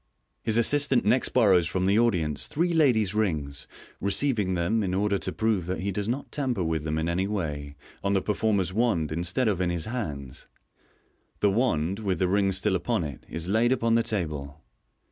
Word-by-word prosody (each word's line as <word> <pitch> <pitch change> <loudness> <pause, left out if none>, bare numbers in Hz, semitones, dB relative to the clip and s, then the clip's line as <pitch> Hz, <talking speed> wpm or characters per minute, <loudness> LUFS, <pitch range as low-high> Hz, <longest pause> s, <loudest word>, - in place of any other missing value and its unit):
His 110 -1 +1
assistant 135 0 +3
next 125 +5 +3
borrows 95 -9 +4
from 90 +2 -1
the 100 +3 +3
audience 85 -11 +1
three 170 +3 0
ladies' 120 - +3
rings, 75 -10 -1 0.3
receiving 100 -2 +1
them, 90 +6 +1
in 95 -2 -1
order 100 0 +1
to - - -2
prove 110 -6 0
that 90 +1 -3
he 100 +1 -1
does 105 +2 -3
not 130 +4 -3
tamper 130 -9 -1
with 80 -2 -2
them 80 0 -1
in 80 +1 -1
any 90 +3 0
way, 75 -8 -4 0.3
on 100 0 +1
the 95 - +2
performer's 100 -3 0
wand 105 -9 +1
instead 90 +10 0
of 95 -4 0
in 90 - +1
his 85 -2 -2
hands. 75 - -5 0.9
The 100 - +4
wand, 95 -5 0
with 95 -4 -1
the 90 - +1
rings 95 0 +2
still 95 0 +1
upon 105 +2 -1
it, 70 -4 -8
is 80 +2 -5
laid 110 +5 +2
upon 115 -3 +1
the 115 - +4
table. 75 -9 -4
100 Hz, 190 wpm, -26 LUFS, 85-115 Hz, 0.9 s, borrows